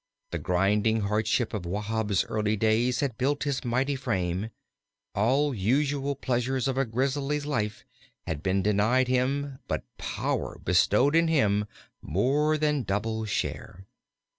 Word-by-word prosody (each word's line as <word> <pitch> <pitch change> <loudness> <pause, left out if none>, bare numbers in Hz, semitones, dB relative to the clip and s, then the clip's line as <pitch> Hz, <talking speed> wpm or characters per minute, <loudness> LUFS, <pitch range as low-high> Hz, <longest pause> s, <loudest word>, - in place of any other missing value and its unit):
The - - -2
grinding 105 +4 +2
hardship 110 +3 0
of 105 -4 -3
Wahb's 105 +1 -1
early 105 0 0
days 115 +5 +2
had 130 -7 -2
built 140 +3 +1
his 140 -3 -1
mighty 130 +3 0
frame. 95 -5 -2 0.6
All 135 +8 +2
usual 140 +6 0
pleasures 130 +1 -1
of 135 - 0
a 135 +1 +1
grizzly's 135 +5 -1
life 105 -8 -2 0.4
had 75 -2 -3
been 95 +1 +1
denied 110 +5 +3
him 130 +2 0
but - - -2 0.2
power - - -2
bestowed 105 - +3
in 115 -12 +3 0.3
more 140 - +1
than 150 -2 +1
double 110 +1 -2
share. 95 -2 -4
120 Hz, 130 wpm, -27 LUFS, 105-135 Hz, 0.6 s, denied